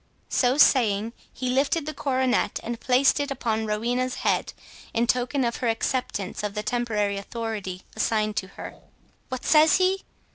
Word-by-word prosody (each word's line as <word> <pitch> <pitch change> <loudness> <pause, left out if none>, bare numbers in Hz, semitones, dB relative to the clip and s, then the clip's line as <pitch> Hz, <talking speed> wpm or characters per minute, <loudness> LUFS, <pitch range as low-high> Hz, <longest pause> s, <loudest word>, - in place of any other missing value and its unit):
So 255 +1 +2
saying, 225 -6 +4 0.2
he 255 0 -3
lifted 280 +4 +1
the 310 - -4
coronet, 260 -3 0
and 235 0 -4
placed 260 +3 +3
it 285 0 -1
upon 225 -4 -1
Rowena's 245 +4 -1
head, - - +1 0.4
in 230 +1 +3
token 250 +3 0
of 235 -1 -1
her 245 - 0
acceptance 225 -4 -2
of 205 0 -4
the 210 - -2
temporary 215 -3 -1
authority 200 -3 -5
assigned 215 -1 0
to 190 - -1
her. - - -7 0.6
"What 255 -1 -5
says 310 0 +6
he?" 375 +1 +2
240 Hz, 155 wpm, -25 LUFS, 215-260 Hz, 0.6 s, says